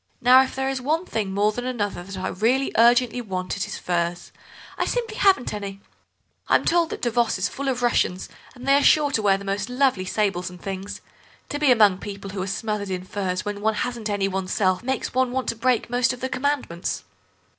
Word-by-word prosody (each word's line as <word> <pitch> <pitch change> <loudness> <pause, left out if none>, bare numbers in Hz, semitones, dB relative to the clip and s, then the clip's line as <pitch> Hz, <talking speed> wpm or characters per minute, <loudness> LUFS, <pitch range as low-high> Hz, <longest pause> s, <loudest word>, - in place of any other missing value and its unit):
Now 255 +2 +7
if 265 - -2
there 265 0 -1
is 270 -1 -2
one 315 +7 0
thing 210 - -2
more 205 +2 +2
than 245 +3 -5
another 215 -7 -2
that 190 +2 -8
I 185 0 -2
really 250 +7 +1
urgently 240 +1 +4
want 185 -4 -4
it 200 - -3
is - - -5
furs. 175 0 -2 0.4
I - - -1
simply 465 -3 -2
haven't 380 - +3
any. 200 -1 -6 0.7
I'm - - +3
told 340 -1 +3
that - - -7
Davos 240 -2 +1
is 190 - 0
full 280 0 -5
of 250 -2 -2
Russians, 190 -6 +1 0.3
and 250 +1 -10
they 275 - +5
are 285 - +5
sure 295 -2 +5
to 225 - +1
wear 195 -2 +3
the 200 - -10
most 200 +3 -2
lovely 250 -7 +1
sables 190 -3 -1
and 180 0 -12
things. 195 +1 -6 0.5
To 290 - -3
be 295 -3 +4
among 210 -6 +5
people 200 -1 -7
who 190 -1 -4
are 190 - -3
smothered 205 0 -3
in 185 -1 -3
furs 185 -1 -3
when 205 -1 -4
one 220 0 +1
hasn't 235 -2 -3
any 200 -1 0
oneself 185 0 0
makes 260 +2 -2
one 255 0 +1
want 260 0 -2
to - - -1
break 240 +1 +1
most 245 +1 +1
of 250 - -9
the 260 - -3
Commandments." 255 -9 -2
220 Hz, 220 wpm, -24 LUFS, 195-255 Hz, 0.7 s, Now